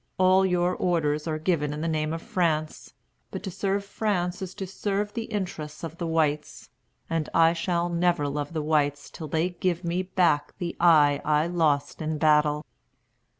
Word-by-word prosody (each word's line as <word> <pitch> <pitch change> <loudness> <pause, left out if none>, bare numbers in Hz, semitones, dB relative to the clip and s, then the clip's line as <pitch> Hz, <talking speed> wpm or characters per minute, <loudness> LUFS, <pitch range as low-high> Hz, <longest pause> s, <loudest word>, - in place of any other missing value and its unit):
All 185 +1 +5
your 180 0 +1
orders 155 -3 0
are 155 -1 -1
given 155 -3 0
in 150 - -5
the 165 - -1
name 155 -1 -1
of 165 0 -4
France. 155 -4 -1 0.3
But - - -6
to 190 - -4
serve 195 +2 -1
France 185 -4 -2
is 185 -1 -6
to 190 - -4
serve 200 +2 -2
the 230 -1 -3
interests 175 -9 -5
of 165 0 -7
the 170 - -2
whites; 150 -8 -1 0.4
and 165 -2 -2
I 165 0 +5
shall 175 0 -1
never 175 -3 +1
love 145 +2 -4
the 155 -2 -2
whites 145 -2 0
till 160 - -7
they 160 +4 0
give 180 0 -2
me 170 +2 -1
back 180 -5 +1
the 175 -1 -4
eye 150 -4 +5
I 150 0 +2
lost 155 -5 0
in 155 0 -2
battle." 150 -1 +3
165 Hz, 180 wpm, -26 LUFS, 150-180 Hz, 0.4 s, All